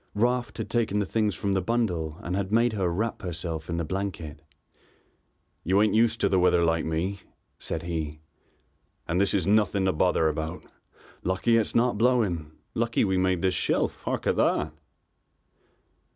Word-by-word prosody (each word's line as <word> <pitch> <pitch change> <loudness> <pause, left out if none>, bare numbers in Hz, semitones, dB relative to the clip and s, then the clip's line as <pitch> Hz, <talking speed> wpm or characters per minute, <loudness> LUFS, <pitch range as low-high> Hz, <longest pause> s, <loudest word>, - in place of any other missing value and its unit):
Raft 120 +3 0
had - - -3
taken 115 -4 0
the 105 - +1
things 105 -1 0
from 100 -1 -1
the 95 - +1
bundle 90 -8 -1
and 90 +2 -2
had 100 0 -2
made 115 +1 +3
her 95 -4 0
wrap 110 +6 -2
herself 85 -2 -5
in 85 - -2
the 85 - -1
blanket. 85 -4 -4 1.2
"You 95 +4 +2
ain't 105 -1 +3
used 115 +1 +3
to - - +4
the 95 - +2
weather 90 -1 +4
like 80 0 +1
me," 85 +5 -2 0.4
said 80 0 -4
he, 80 -3 -4 0.9
"and 90 +3 +1
this 100 - +2
is 95 -5 +1
nothing 100 -1 +2
to 95 - +2
bother 80 +1 +2
about. 80 +3 -3 0.6
Lucky 95 +6 +1
it's 115 -2 +1
not 120 -2 +2
blowing. 105 -11 +1 0.2
Lucky 115 0 +1
we 95 -2 +1
made 95 -1 +1
this 95 -1 +2
shelf. - - 0
Hark - - -3
at - - +1
that!" - - +1
95 Hz, 170 wpm, -26 LUFS, 85-110 Hz, 1.2 s, to